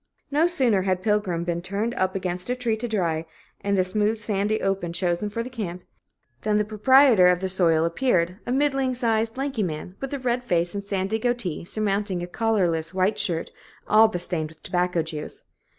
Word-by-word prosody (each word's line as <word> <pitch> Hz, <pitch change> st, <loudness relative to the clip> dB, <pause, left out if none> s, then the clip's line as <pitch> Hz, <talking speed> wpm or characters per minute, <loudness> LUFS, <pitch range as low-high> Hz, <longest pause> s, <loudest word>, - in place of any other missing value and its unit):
No 305 Hz, +4 st, +4 dB
sooner 250 Hz, -, +2 dB
had 185 Hz, -1 st, -1 dB
Pilgrim 205 Hz, -5 st, 0 dB
been 170 Hz, 0 st, -2 dB
turned 200 Hz, +6 st, -2 dB
up 185 Hz, -4 st, -1 dB
against 180 Hz, +1 st, -3 dB
a 250 Hz, -, +1 dB
tree 240 Hz, -3 st, 0 dB
to 230 Hz, +2 st, -4 dB
dry, 170 Hz, -8 st, 0 dB, 0.4 s
and 200 Hz, 0 st, +1 dB
a 185 Hz, -, +4 dB
smooth 210 Hz, +4 st, 0 dB
sandy 210 Hz, 0 st, -1 dB
open 195 Hz, -3 st, -1 dB
chosen 175 Hz, +3 st, -1 dB
for 230 Hz, +3 st, -3 dB
the 250 Hz, -, -7 dB
camp, 180 Hz, -7 st, -5 dB, 0.6 s
than 210 Hz, -1 st, +1 dB
the 210 Hz, -, +1 dB
proprietor 220 Hz, -1 st, +5 dB
of 180 Hz, 0 st, +4 dB
the 190 Hz, -, -2 dB
soil 170 Hz, -4 st, +2 dB
appeared 180 Hz, -1 st, +1 dB
a -, -, -1 dB
middling 270 Hz, -1 st, +1 dB
sized, 225 Hz, -1 st, 0 dB
lanky 270 Hz, -4 st, -2 dB
man, 180 Hz, 0 st, -4 dB
with 270 Hz, -, -5 dB
a 285 Hz, -, -2 dB
red 250 Hz, -1 st, -1 dB
face 175 Hz, -6 st, 0 dB
and 200 Hz, -, -3 dB
a -, -, -20 dB
sandy 200 Hz, +2 st, -1 dB
goatee 240 Hz, -8 st, -1 dB
surmounting 200 Hz, -2 st, -1 dB
a -, -, -2 dB
collarless 180 Hz, -5 st, 0 dB
white 190 Hz, +3 st, +1 dB
shirt 165 Hz, -2 st, -2 dB, 0.4 s
all 220 Hz, +1 st, +6 dB
bestained 175 Hz, -5 st, -3 dB
with 160 Hz, 0 st, -19 dB
tobacco 180 Hz, -2 st, 0 dB
juice. 155 Hz, -1 st, -7 dB
200 Hz, 195 wpm, -24 LUFS, 180-225 Hz, 0.6 s, all